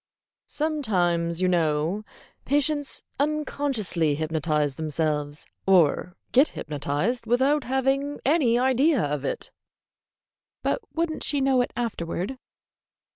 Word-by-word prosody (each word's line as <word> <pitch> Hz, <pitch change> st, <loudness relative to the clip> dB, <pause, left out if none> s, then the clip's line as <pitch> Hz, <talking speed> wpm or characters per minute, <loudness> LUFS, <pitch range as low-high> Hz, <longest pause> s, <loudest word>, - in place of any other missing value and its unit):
"Sometimes, 185 Hz, -, 0 dB
you -, -, +4 dB
know, 165 Hz, +3 st, +1 dB, 0.4 s
patients 290 Hz, +1 st, 0 dB, 0.2 s
unconsciously 275 Hz, -, 0 dB
hypnotize 155 Hz, -2 st, 0 dB
themselves, 150 Hz, 0 st, -1 dB, 0.2 s
or 180 Hz, -1 st, +3 dB, 0.2 s
get 270 Hz, +5 st, +6 dB
hypnotized, 150 Hz, -, -2 dB
without 265 Hz, +5 st, +2 dB
having 270 Hz, +2 st, 0 dB
any 270 Hz, -5 st, +3 dB
idea 265 Hz, +1 st, +3 dB
of 145 Hz, -1 st, -2 dB
it." -, -, -3 dB, 1.1 s
"But -, -, 0 dB
would 330 Hz, 0 st, 0 dB
n't -, -, -5 dB
she 290 Hz, -, 0 dB
know 265 Hz, -2 st, +3 dB
it 245 Hz, -, -2 dB
afterward?" 220 Hz, 0 st, -3 dB
220 Hz, 105 wpm, -25 LUFS, -, 1.1 s, get